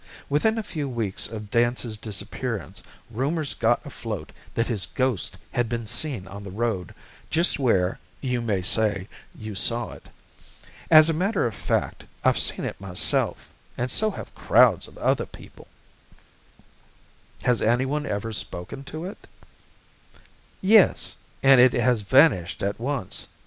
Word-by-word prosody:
Within 220 +11 +2
a 220 - -1
few 150 -8 -4
weeks 115 -6 -2
of 105 -2 -8
Dance's 120 -1 +1
disappearance 105 -2 -3 0.3
rumours 140 +6 -1
got 120 +2 +1
afloat 110 - -6 0.2
that 115 - +1
his 105 -8 -1
ghost 130 -4 -1
had 120 -2 0
been 115 -1 -3
seen 125 -3 -2
on 100 +1 -9
the 100 - -7
road, 100 -4 -2 0.3
just 165 -1 +2
where, 95 -9 +2 0.2
you 125 -3 -1
may 105 -5 -1
say, 105 -2 0 0.3
you 110 -1 -7
saw 115 +5 +1
it. - - -13 0.8
As 155 -1 +8
a 165 - +1
matter 190 - 0
of 115 - -1
fact, - - -2 0.2
I've - - +3
seen - - +1
it - - -5
myself 95 -2 0 0.3
and 125 +1 -1
so 215 - +3
have 205 - -8
crowds - - +4
of - - -16
other - - +1
people." - - -14 1.8
"Has 125 -2 +2
anyone 130 +6 +1
ever 105 +2 -3
spoken 95 +5 -6
to 155 +4 -6
it?" 195 - -9 1.3
"Yes 205 0 +4 0.3
and 135 -2 +7
it 125 0 +6
has 120 -2 +2
vanished 100 - +3
at 100 +2 -2
once. 125 -4 -3
120 Hz, 145 wpm, -25 LUFS, 105-140 Hz, 1.8 s, As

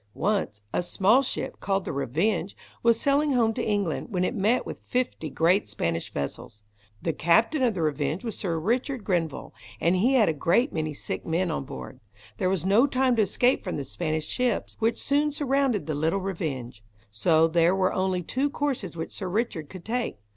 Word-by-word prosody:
Once, 195 - -1
a - - +1
small 200 +8 +3
ship, 270 - -4
called 195 -1 -1
the - - -3
Revenge, 160 - -1 0.2
was 230 -1 +4
sailing 285 +1 +2
home 230 -3 +3
to - - -3
England, 200 -6 -1
when 180 -5 0
it 185 - 0
met 220 +3 +1
with - - -7
fifty 250 -10 -2
great 180 +5 +2
Spanish 85 0 -2
vessels. 75 +9 -5 0.4
The 165 - 0
captain 225 - +3
of 240 -5 +2
the 170 - -1
Revenge 150 - -1
was 225 - -3
Sir 170 -5 -2
Richard 240 - -1
Grenville, 170 -7 -2 0.3
and 170 +2 +2
he 230 +9 +3
had 225 -5 +5
a 160 - +2
great 175 - +2
many 155 -2 -2
sick - - -4
men 170 +2 0
on 140 - -3
board. 130 -1 -8 0.4
There 185 - +1
was 185 -3 0
no 215 +8 +5
time 260 -2 +2
to - - +5
escape 245 +5 +2
from 185 - -3
the 140 - -3
Spanish 155 -1 -2
ships, 250 -1 -1
which 225 0 +1
soon 290 +2 +1
surrounded 275 -6 +1
the 155 - -2
little 160 +6 +1
Revenge. 145 - -4 0.3
So 160 +10 +3
there 170 +2 +3
were 185 -1 +1
only 185 -1 0
two 270 - 0
courses 265 - -3
which 160 - -4
Sir 190 - -4
Richard 180 -7 -2
could 185 -3 -10
take. 240 - -2
190 Hz, 195 wpm, -26 LUFS, 160-240 Hz, 0.4 s, had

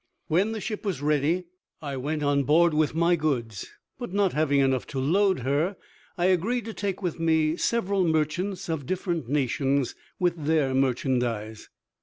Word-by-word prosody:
When 185 +7 +2
the 220 - -3
ship 215 -1 -4
was 180 -10 -3
ready 150 +4 +1 0.4
I 140 -3 -5
went 150 +4 -2
on 145 0 +2
board 160 +4 +4
with 155 0 +1
my 170 +1 +3
goods; 125 - -2 0.3
but 240 -7 -5
not 200 -1 +1
having 145 -2 +2
enough 135 -2 +1
to 135 - -4
load 185 +4 +2
her, 145 - 0 0.4
I 175 - +1
agreed 200 +6 +1
to 225 - -6
take 200 -2 -3
with 175 -2 -2
me 160 -1 +2
several 200 -1 0
merchants 180 +5 -1
of 160 -6 -3
different 175 - -2
nations, 140 -1 0 0.2
with 170 -4 -1
their 150 -4 +2
merchandise. 125 -4 -1
155 Hz, 165 wpm, -26 LUFS, 140-185 Hz, 0.4 s, board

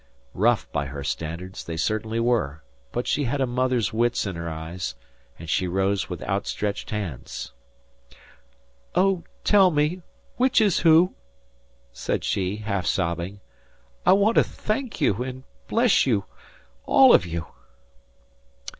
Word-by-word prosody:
Rough, - - +2
by 70 -1 -1
her 70 +1 -6
standards, 85 +6 -5
they 85 -1 -5
certainly 110 +6 -1
were; 115 - 0 0.3
but 120 - -2
she 145 - 0
had 135 +4 -1
a 135 - +2
mother's 125 -3 0
wits 120 +1 +1
in 95 -3 -4
her 85 0 -4
eyes, 80 -3 -5 0.4
and 80 - -10
she 90 +4 +1
rose 95 +2 0
with 90 -3 -5
out 100 +1 -2
stretched 105 -1 -3
hands. 95 - -5 1.4
"Oh, 190 -2 +2 0.2
tell 195 -3 +6
me, 155 +3 0 0.4
which 255 +1 +3
is 205 -5 +3
who?" 165 +3 +5 0.8
said - - -2
she, 95 0 -1
half 100 -3 -3
sobbing. 90 +2 -1 0.6
"I - - +6
want 205 +3 +3
to - - +7
thank 225 +2 -4
you 100 +4 +2
and 130 0 -5 0.2
bless 235 - +3
you 105 -6 +1 0.6
all - - +7
of - - +6
you." 85 0 -4
105 Hz, 140 wpm, -24 LUFS, 85-145 Hz, 1.4 s, to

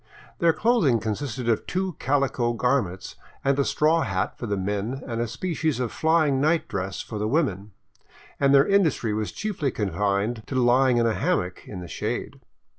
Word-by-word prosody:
Their 170 - +5
clothing 175 - +2
consisted 120 +3 -3
of 115 -2 +1
two 185 0 -1
calico 135 -4 +1
garments 115 -7 -1 0.3
and 140 0 +2
a - - +4
straw 155 +4 +2
hat 95 -7 -1
for 120 - -6
the 100 -1 -1
men 105 +7 -3
and 115 -2 -3
a 120 - -1
species 155 +3 -2
of 125 -3 -2
flying 155 -4 +2
night 155 +1 +2
dress 95 -1 -3
for 110 - -6
the 105 - -1
women; 105 - -1 0.7
and 140 -1 +3
their 140 0 +6
industry 160 - +2
was 105 0 -2
chiefly 200 -10 -2
confined 105 +2 -1
to 135 - -5
lying 125 0 +4
in 120 - +3
a 115 - +2
hammock 125 - -1
in 95 -3 -7
the 90 - -8
shade. - - -4
125 Hz, 180 wpm, -25 LUFS, 105-150 Hz, 0.7 s, their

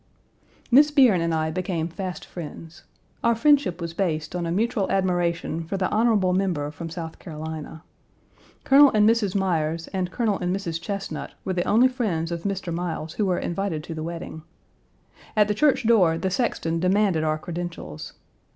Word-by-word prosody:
Miss 290 +5 +7
Bierne 255 - +5
and 165 0 0
I 160 -1 0
became 175 -2 -2
fast 185 +1 -6
friends. 165 -1 -9 0.4
Our 235 0 +3
friendship 275 - +3
was 170 -1 -5
based 165 -4 -2
on 175 -1 -2
a - - -2
mutual 210 +1 0
admiration 175 -3 0
for 195 +4 -3
the 185 -1 +1
honorable 215 -5 +3
member 175 -6 0
from 165 +2 -7
South 165 -1 -7
Carolina. 160 0 -7 0.8
Colonel 280 +1 +7
and 210 0 +5
Mrs. 220 -4 +2
Myers 165 -4 0
and 185 -2 -2
Colonel 215 -1 0
and 180 0 -1
Mrs. 170 -4 -4
Chesnut 200 -1 -5
were 190 - -1
the 175 -1 -1
only 235 +5 +5
friends 200 -11 -2
of 170 +1 -5
Mr. 195 -3 -2
Miles 165 -2 -4
who 210 - 0
were 180 -1 +1
invited 175 -3 -2
to 165 - -6
the 160 - -5
wedding. 165 -1 -6 0.9
At 210 -1 +4
the 210 - +1
church 270 +2 +2
door 185 -8 +4
the 190 +2 -2
sexton 165 -7 -1
demanded 185 -2 +2
our 155 0 +1
credentials. 175 +1 -6
180 Hz, 170 wpm, -24 LUFS, 165-205 Hz, 0.9 s, Miss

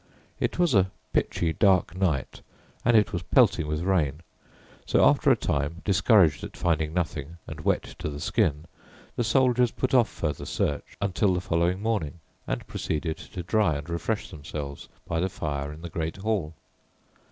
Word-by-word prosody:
It - - -1
was 175 -5 +3
a 95 -2 +4 0.2
pitchy 80 -2 0
dark 95 -3 +3
night, 85 -8 -1 0.4
and 120 -1 +5
it 105 - +2
was 85 - -1
pelting 80 - +3
with 75 +2 -2
rain, 85 -5 0 0.6
so - - +3
after - - +4
a - - +6
time, 75 +5 -2
discouraged 95 - +4
at - - -8
finding 80 -3 0
nothing 85 -2 -3
and 75 - -8
wet - - +1 0.2
to - - -3
the 70 -1 -6
skin, 75 +1 0 0.5
the 120 - 0
soldiers 125 +1 +3
put 130 +3 -2
off 125 -3 +5
further 75 -3 -4
search 75 - -2
until 100 -1 +1
the - - 0
following 90 +2 0
morning, 95 -8 -1 0.3
and - - -3
proceeded 80 +1 -3
to 90 - -8
dry 100 -4 +2
and 70 +3 -6
refresh 105 +6 -2
themselves 70 -1 -7 0.2
by 80 - -1
the 95 +3 0
fire 70 -4 -3
in 80 +2 -11
the - - -4
great 80 +1 -3
hall. 95 -6 -2
85 Hz, 170 wpm, -26 LUFS, 75-100 Hz, 0.6 s, a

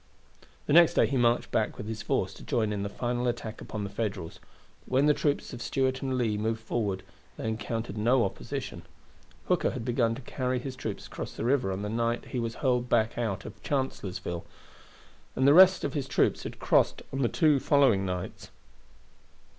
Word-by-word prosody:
The - - 0
next 170 0 +7
day - - +5
he 140 - -2
marched 120 -1 +2
back 110 - 0
with - - -6
his 110 -1 -4
force 95 -3 -1
to - - -12
join 110 -3 0
in 100 - -2
the 100 - -2
final 120 +3 -2
attack 115 -2 -4
upon 105 -1 -5
the 100 - -4
Federals; 100 -7 -4 0.4
but - - -20
when 135 +3 +4
the 150 - +5
troops 145 -1 -1
of 120 - -7
Stuart 130 +2 0
and 130 -2 -1
Lee 110 -4 0
moved 110 +1 -1
forward 105 -4 -2 0.3
they - - -4
encountered 110 -1 -3
no 120 +3 +3
opposition. 130 -10 -5 0.7
Hooker - - +2
had 115 - -5
begun 120 -2 +1
to 135 - -8
carry 130 +1 -2
his 130 +1 -5
troops 110 -5 -5
across - - -7
the - - -4
river 125 -6 +2
on 95 +2 -3
the - - -2
night 115 +2 -1
he 125 - -2
was 115 -1 -3
hurled 125 -2 0
back 110 -1 +2
out 110 -5 -2
of 105 -1 -10
Chancellorsville, 95 - -3 0.9
and 130 - +3
the 140 - +7
rest 185 +2 +7
of 140 - -2
his 140 -3 -2
troops - - +2
had - - -7
crossed - - +2
on 135 - -1
the 120 - +2
two 150 -3 +3
following 135 -9 +4
nights. 90 -1 -5
120 Hz, 200 wpm, -28 LUFS, 105-130 Hz, 0.9 s, next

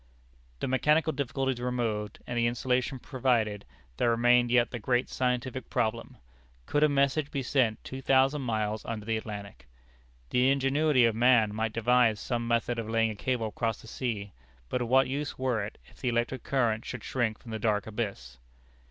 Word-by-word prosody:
The - - -1
mechanical 150 +5 +2
difficulties 135 -2 -2
removed, 115 -4 -2
and 120 - -5
the 120 0 +2
insulation 125 +2 0
provided, 120 -6 0 0.3
there 120 - +2
remained 120 +1 +4
yet 120 -1 +3
the 120 - -4
great 125 +3 0
scientific 125 0 -2
problem: 115 +1 -2 0.5
Could 145 - 0
a 150 - +5
message 140 +1 +1
be 140 -2 -3
sent 120 -4 +1
two 130 0 -7
thousand 135 +2 +3
miles 110 -3 -2
under 110 -2 -5
the 115 0 0
Atlantic? 105 - -7 0.6
The 125 +1 +3
ingenuity 135 0 +3
of 115 - +2
man 115 -2 +4
might 110 0 -2
devise 115 -2 +3
some 120 -2 -2
method 120 0 0
of 110 -1 -4
laying 115 0 +2
a - - -7
cable 115 0 -1
across 115 +1 -2
the - - -14
sea, 105 -5 -4 0.4
but 125 - -1
of 120 - -1
what 130 +2 +4
use 145 +2 -3
were 125 -5 0
it, 100 - -7
if - - -20
the 125 - 0
electric 120 +1 -1
current 115 -5 0
should - - -7
shrink 115 -4 -1
from 115 - -12
the 110 - -3
dark 105 -2 +1
abyss? 100 - -5
120 Hz, 180 wpm, -29 LUFS, 110-130 Hz, 0.6 s, a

